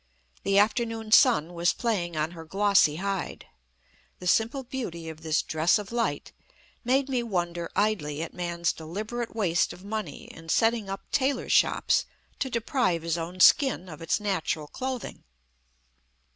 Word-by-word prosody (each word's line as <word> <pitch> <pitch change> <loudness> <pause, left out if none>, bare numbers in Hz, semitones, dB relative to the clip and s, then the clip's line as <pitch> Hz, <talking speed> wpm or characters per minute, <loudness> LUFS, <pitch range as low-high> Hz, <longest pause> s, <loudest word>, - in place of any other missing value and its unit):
The 195 0 +1
afternoon 225 +1 +1
sun 225 - +5
was 170 +1 +2
playing 180 -9 -2
on 155 +2 0
her 165 -2 -9
glossy 195 -3 +3
hide. 195 +2 -3 0.7
The 180 - -10
simple 230 +8 +2
beauty 185 -11 -5
of 160 0 -10
this 160 -1 +1
dress 160 +5 +2
of 210 0 -7
light 235 -1 -2 0.5
made 260 +2 +2
me 260 -3 0
wonder 175 -6 -2
idly 165 -8 0
at 165 - -7
man's 170 -1 -1
deliberate 215 +9 -5
waste 180 -6 +1
of 185 - -14
money 210 -8 -5
in 165 0 -12
setting 225 +1 +2
up 195 0 -4
tailors' 275 0 0
shops - - +3 0.3
to 265 - -1
deprive 235 - 0
his 165 -1 0
own 170 +2 -5
skin 265 -8 +5
of 155 -1 -10
its 165 - 0
natural 185 -6 -1
clothing. 255 - -5
195 Hz, 150 wpm, -27 LUFS, 170-230 Hz, 0.7 s, sun